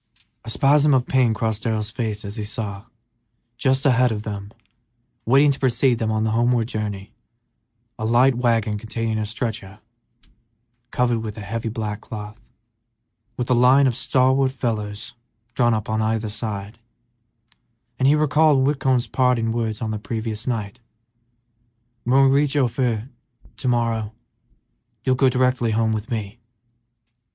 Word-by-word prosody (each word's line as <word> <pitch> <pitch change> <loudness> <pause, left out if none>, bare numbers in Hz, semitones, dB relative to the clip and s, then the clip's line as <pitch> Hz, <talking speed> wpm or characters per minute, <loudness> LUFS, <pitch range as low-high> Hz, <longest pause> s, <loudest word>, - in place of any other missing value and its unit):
A 115 - -8
spasm 145 +4 +4
of 125 -1 +1
pain 130 -3 +2
crossed 110 -1 -2
Darrell's 110 -2 -2
face 110 -4 -4
as 100 +1 -7
he 105 - -3
saw, 105 -1 -5 0.7
just 130 +2 +1
ahead 125 -2 +4
of 105 -1 -4
them, 100 -1 -6 0.8
waiting 140 +4 +5
to 140 - -4
precede 125 -1 +2
them 110 - -1
on 110 0 0
the 110 - 0
homeward 120 0 +2
journey, 105 -4 -5 0.9
a - - -4
light 120 +4 +4
wagon 115 -4 0
containing 110 0 -3
a 105 - -2
stretcher 110 -2 -5 1.1
covered 120 -2 +1
with 110 -1 -6
a - - -6
heavy 115 +3 -4
black 110 -2 -4
cloth, 110 +2 -9 1.0
a - - +2
line 125 +3 +5
of 125 -3 +1
stalwart 130 +1 +2
young 130 - -14
fellows 105 -4 -3 0.4
drawn 120 -2 +2
up 110 -1 -4
on 110 0 -1
either 110 0 -1
side, 105 0 -5 1.2
and 130 - +3
he 145 - +5
recalled 150 -2 +3
Whitcomb's 135 -3 +1
parting 125 -3 +1
words 115 -1 -2
on 110 - -2
the 105 - -3
previous 110 0 -4
night, 110 -2 -3 1.3
"When 130 +3 +4
we 135 - +5
reach 145 +1 +2
Ophir 125 -3 0 0.5
to - - -4
morrow, 115 -3 0 0.9
you'll 130 - +2
go 130 +1 +3
directly 125 -2 +1
home 110 0 +1
with 110 +2 -3
me." 110 -2 -4
115 Hz, 145 wpm, -22 LUFS, 110-130 Hz, 1.3 s, waiting